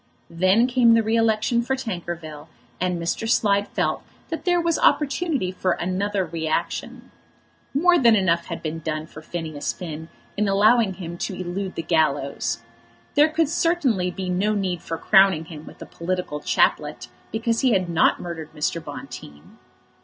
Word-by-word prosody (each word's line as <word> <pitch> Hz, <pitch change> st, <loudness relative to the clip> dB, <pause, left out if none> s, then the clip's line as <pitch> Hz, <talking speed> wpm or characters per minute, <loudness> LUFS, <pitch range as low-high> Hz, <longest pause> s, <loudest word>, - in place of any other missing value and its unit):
Then 185 Hz, +7 st, +3 dB
came 245 Hz, -2 st, +4 dB
the 225 Hz, -, +3 dB
re 220 Hz, +1 st, 0 dB
election 225 Hz, +1 st, +2 dB
for 265 Hz, +3 st, -1 dB
Tankerville, 175 Hz, -, -6 dB, 0.3 s
and 180 Hz, -1 st, -1 dB
Mr. 170 Hz, +7 st, -2 dB
Slide 205 Hz, -3 st, +2 dB
felt -, -, -1 dB, 0.3 s
that 325 Hz, -, -5 dB
there 355 Hz, -1 st, +3 dB
was 335 Hz, -1 st, +1 dB
opportunity 290 Hz, -, +1 dB
for 185 Hz, -1 st, 0 dB
another 190 Hz, +3 st, -1 dB
reaction. 160 Hz, -1 st, -3 dB, 0.6 s
More 350 Hz, +4 st, +4 dB
than 235 Hz, -3 st, +6 dB
enough 170 Hz, -4 st, +2 dB
had 170 Hz, -, -6 dB
been 160 Hz, 0 st, -3 dB
done 155 Hz, -1 st, -3 dB
for 155 Hz, -, -12 dB
Phineas 155 Hz, -3 st, -4 dB
Finn 160 Hz, -2 st, -7 dB, 0.3 s
in 210 Hz, 0 st, +1 dB
allowing 205 Hz, +1 st, +4 dB
him 175 Hz, -2 st, -7 dB
to 190 Hz, -, -3 dB
elude 185 Hz, +1 st, -4 dB
the 165 Hz, -, -3 dB
gallows. 140 Hz, -7 st, 0 dB, 0.5 s
There 300 Hz, +2 st, +5 dB
could 315 Hz, 0 st, +1 dB
certainly 280 Hz, -, +1 dB
be 185 Hz, +1 st, -5 dB
no 195 Hz, +4 st, +1 dB
need 185 Hz, -4 st, -2 dB
for 165 Hz, -, -4 dB
crowning 190 Hz, -3 st, +4 dB
him 160 Hz, -2 st, -10 dB
with -, -, -12 dB
a -, -, -9 dB
political 180 Hz, -3 st, -4 dB
chaplet 145 Hz, -4 st, +1 dB, 0.2 s
because 230 Hz, +1 st, 0 dB
he 255 Hz, -3 st, +3 dB
had 185 Hz, -2 st, +1 dB
not 170 Hz, -1 st, +3 dB
murdered 165 Hz, -3 st, -7 dB
Mr. 155 Hz, +2 st, -2 dB
Bonteen. 120 Hz, -, -10 dB
185 Hz, 160 wpm, -23 LUFS, 165-225 Hz, 0.6 s, than